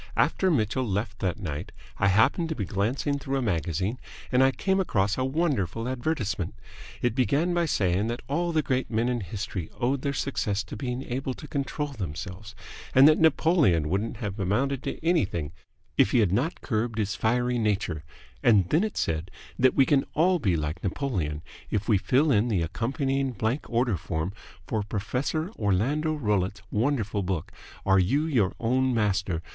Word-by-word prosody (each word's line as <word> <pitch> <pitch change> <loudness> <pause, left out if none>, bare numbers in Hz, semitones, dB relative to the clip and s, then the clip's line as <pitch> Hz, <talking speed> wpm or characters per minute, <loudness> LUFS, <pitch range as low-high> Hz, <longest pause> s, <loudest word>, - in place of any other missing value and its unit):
"After 190 - +3
Mitchell 130 - +1
left 105 0 -2
that 90 -2 -1
night 75 -8 -5 0.3
I 100 - +3
happened 115 - +3
to 160 - -2
be 105 - -2
glancing 120 - -1
through 135 0 -2
a - - 0
magazine, 95 +3 -1 0.3
and 125 +1 +5
I 135 - +6
came 190 +8 0
across 105 - +1
a 130 - -1
wonderful 130 - 0
advertisement. 120 - -2 0.5
It 120 -2 +2
began 140 +7 +1
by 170 -1 +1
saying 95 - +1
that 120 +1 -4
all 170 +5 0
the 155 -2 +1
great 130 -1 -1
men 115 +2 +1
in 125 -1 0
history 95 -2 -5
owed 130 +2 +1
their 140 - -1
success 105 -8 -1
to - - -8
being 125 +3 -3
able 130 0 -3
to 150 - -10
control 145 +1 -2
themselves, 100 - -6 0.4
and 135 +2 +9
that 155 - +5
Napoleon 155 - +3
wouldn't 105 +6 -1
have 105 -3 -5
amounted 125 +8 0
to - - -3
anything 95 - +1 0.5
if - - +6
he 125 - +2
had 105 -6 +3
not 130 - 0
curbed 115 -1 -1
his 100 -3 0
fiery 120 +3 +1
nature, 95 -8 -1 0.4
and 100 -7 +4
then 165 +6 +4
it 215 - -3
said 80 +2 -1 0.3
that 130 0 +4
we 135 - +5
can 135 0 +3
all 180 +3 +3
be 95 - +1
like 75 +2 -3
Napoleon 90 - -2 0.3
if 105 -1 -1
we 105 -4 +4
fill 130 - +3
in 110 -1 +3
the 100 -8 +1
accompanying 135 - -1
blank 115 +6 -2
order 115 -4 +1
form 80 +3 -3 0.3
for 110 +4 -1
Professor 125 - -2
Orlando 130 +11 +1
Rollitt's 105 -6 -1
wonderful 110 -3 0
book, 90 -4 -3 0.3
'Are 95 0 +5
You 135 - +2
Your 120 - +1
Own 130 +2 +1
Master?' 100 -6 0
115 Hz, 175 wpm, -27 LUFS, 95-135 Hz, 0.5 s, and